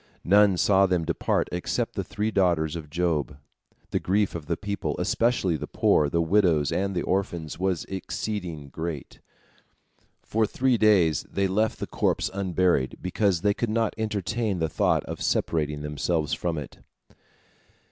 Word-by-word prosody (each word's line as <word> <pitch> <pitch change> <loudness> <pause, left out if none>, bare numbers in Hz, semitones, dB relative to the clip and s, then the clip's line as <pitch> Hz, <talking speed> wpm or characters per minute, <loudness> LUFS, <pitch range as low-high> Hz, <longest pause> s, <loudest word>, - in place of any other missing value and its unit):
None 100 0 +5
saw 95 +1 +4
them 90 -3 0
depart 85 - 0
except 90 0 -2
the - - -2
three 105 +1 -2
daughters 85 -5 +1
of 80 -3 -7
Job. 80 -5 -1 0.5
The - - +1
grief 100 +2 +1
of 80 -3 -6
the 85 - -1
people, 100 -7 -3
especially 95 -2 +1
the - - -6
poor, 75 -1 +2
the 85 +2 +1
widows, 85 -5 +3
and 100 0 -1
the 85 - 0
orphans, 85 -5 -2
was 95 -2 0
exceeding 90 -5 -5
great. 80 +1 -6 1.0
For 110 0 +1
three 125 +1 +1
days 95 -8 +3
they 100 0 +1
left 105 +4 0
the - - -4
corpse - - 0
unburied, 90 -7 +1
because 95 -1 0
they 105 +1 +3
could 120 +2 -2
not 115 0 0
entertain 110 -1 -2
the 80 -1 0
thought - - +1
of - - -7
separating 75 -2 0
themselves 75 +1 -1
from 85 -2 -2
it. 75 - -7
90 Hz, 155 wpm, -26 LUFS, 80-100 Hz, 1.0 s, None